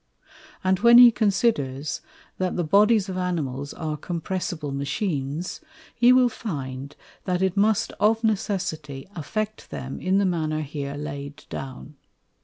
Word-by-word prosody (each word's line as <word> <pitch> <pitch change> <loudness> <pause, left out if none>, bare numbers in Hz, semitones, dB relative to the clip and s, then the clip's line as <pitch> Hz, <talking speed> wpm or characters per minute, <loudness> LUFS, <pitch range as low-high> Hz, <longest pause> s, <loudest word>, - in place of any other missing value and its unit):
And 185 0 +2
when 235 +2 +7
he 245 -1 +10
considers, 175 - 0 0.4
that 185 -1 0
the 175 - 0
Bodies 205 +4 +4
of 185 -1 -4
Animals 145 -6 -2
are 155 -1 -4
compressible 170 -2 -3
Machines, 140 +2 -3 0.3
he 240 +1 +5
will 255 0 +6
find 140 - -5 0.3
that 180 0 0
it 190 -1 +1
must 220 +2 +2
of 220 +2 +3
necessity 190 -10 -2
affect 215 +8 -4
them 135 +1 -6
in 185 +1 +2
the 200 - +3
manner 155 -4 0
here 145 -1 -5
laid 145 0 -7
down. 135 +2 -7
175 Hz, 135 wpm, -25 LUFS, 140-205 Hz, 0.4 s, he